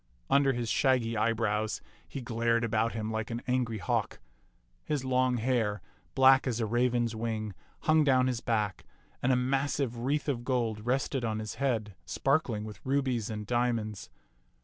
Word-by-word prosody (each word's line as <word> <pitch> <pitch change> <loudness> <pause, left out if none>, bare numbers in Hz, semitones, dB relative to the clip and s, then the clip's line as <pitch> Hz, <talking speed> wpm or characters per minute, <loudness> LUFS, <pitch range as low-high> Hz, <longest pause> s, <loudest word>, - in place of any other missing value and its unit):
Under 140 -1 +4
his 120 -1 -2
shaggy 125 -4 +2
eyebrows 110 -1 0 0.3
he 135 - -6
glared 115 0 +1
about 115 0 +1
him 110 -1 -3
like 110 0 -3
an 120 0 -4
angry 125 -3 0
hawk. 90 - -1 0.7
His 145 -3 -2
long 130 -1 +2
hair, 110 -3 0 0.4
black 135 0 +6
as 120 -2 -1
a 115 - +1
raven's 120 0 +1
wing, 110 -2 -3 0.3
hung 155 -1 +4
down 130 -3 +4
his 125 -2 -1
back, 105 -4 -1 0.4
and 130 - +2
a - - +4
massive 135 -1 0
wreath 140 +6 -1
of 125 -5 -1
gold 115 -4 -1
rested 130 0 0
on 110 -2 -1
his 110 -1 -4
head, 110 -7 0
sparkling 135 -7 0
with 105 -1 -9
rubies 130 -5 0
and 105 -1 -4
diamonds. 115 -3 -1
120 Hz, 160 wpm, -30 LUFS, 110-130 Hz, 0.7 s, black